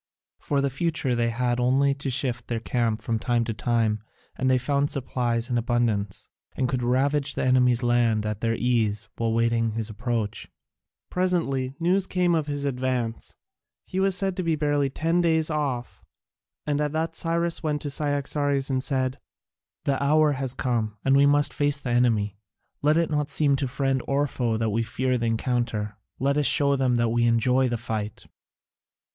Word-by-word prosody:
For 140 -1 0
the 140 -1 0
future 150 -2 -1
they 120 -1 +1
had 120 +1 -1
only 135 +3 +3
to 140 0 -4
shift 125 -2 -2
their 115 -1 -2
camp 115 -1 -1
from 115 -2 -1
time 120 0 +1
to 115 0 -3
time, 110 -2 0 0.3
and 130 0 0
they 130 - +4
found 140 +3 0
supplies 120 -3 -1
in 120 -2 0
abundance, 115 -5 -1 0.3
and 130 - 0
could 125 -1 -1
ravage 140 +4 +1
the - - -1
enemy's 125 -1 +3
land 120 -3 +2
at 105 -1 -3
their 115 0 +1
ease 115 -4 0
while 115 -1 0
waiting 115 -1 +1
his 110 0 -3
approach. 110 -1 -3 0.6
Presently 150 -8 0
news 185 +3 +2
came 180 -1 +1
of 155 -3 0
his 145 -1 -3
advance: 125 -3 -2 0.5
he 185 - -3
was 195 -1 +2
said 195 -1 +1
to - - 0
be 165 -2 +1
barely 145 -2 +1
ten 165 +5 0
days' 160 -2 +2
off, 135 -5 -3 0.6
and 150 0 0
at 150 0 -1
that 160 +1 -2
Cyrus 170 0 0
went 150 -2 -2
to 145 - -2
Cyaxares 145 -1 0
and 130 -1 0
said: 130 -2 0 0.7
"The 140 -1 0
hour 150 +2 +4
has 130 -2 -3
come, 110 -4 -1
and 135 0 +4
we 140 +1 +5
must 145 0 +3
face 145 0 +1
the 125 - -4
enemy. 110 -5 +1 0.4
Let 150 +2 +3
it 170 -1 +1
not 150 -1 0
seem 140 0 +2
to 135 - -1
friend 135 0 0
or 140 +1 +2
foe 120 -4 -1
that 110 -1 0
we 115 +3 +1
fear 125 +2 -1
the 115 - -1
encounter: 115 -2 -1 0.2
let 140 +2 +1
us 145 - +3
show 140 -1 +4
them 130 -2 +1
that 120 -1 +2
we 120 +1 +2
enjoy 125 +3 +2
the 120 - -1
fight." 110 -2 -5
130 Hz, 185 wpm, -25 LUFS, 115-145 Hz, 0.7 s, we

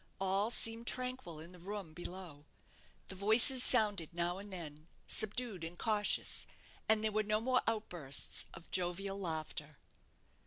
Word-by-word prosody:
All 195 +3 0
seemed 230 0 +1
tranquil 250 -10 -3
in 165 +3 -10
the 180 - -15
room 195 -2 -7
below. 175 -3 -9 0.6
The - - +1
voices 225 +6 +6
sounded 205 -8 +3
now 175 +2 -2
and 205 0 -10
then, 155 -4 -8 0.2
subdued 215 -3 +1
and 165 +2 -7
cautious, 210 -2 0 0.4
and 220 0 +3
there 220 - 0
were 215 +1 +1
no 215 0 0
more 250 +2 +1
outbursts 175 - +1
of 165 - -14
jovial 190 +2 -1
laughter. 155 -4 -4
195 Hz, 145 wpm, -34 LUFS, 170-215 Hz, 0.6 s, voices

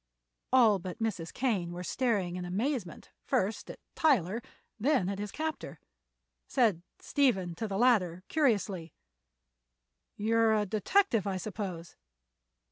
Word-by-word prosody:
All 230 -6 +5
but 185 +2 -6
Mrs. 210 -8 -3
Kane 205 -10 -1
were 175 +1 -6
staring 200 -3 0
in 180 - -4
amazement 205 - -3
first 205 +3 -1
at - - -7 0.2
Tyler, 230 - +2 0.4
then 255 -5 +2
at 200 0 -3
his 205 0 -4
captor. 315 0 -4 0.7
Said 220 -10 +2 0.2
Stephen 195 - +1
to 220 +7 -4
the 195 -1 -3
latter, 190 -7 +3
curiously: 200 - 0 1.2
"You 220 +2 +1
are 225 -1 +4
a 210 -1 +1
detective, 220 - +2
I 190 -1 -1
suppose!" 185 -4 -6
210 Hz, 125 wpm, -30 LUFS, 180-245 Hz, 1.2 s, All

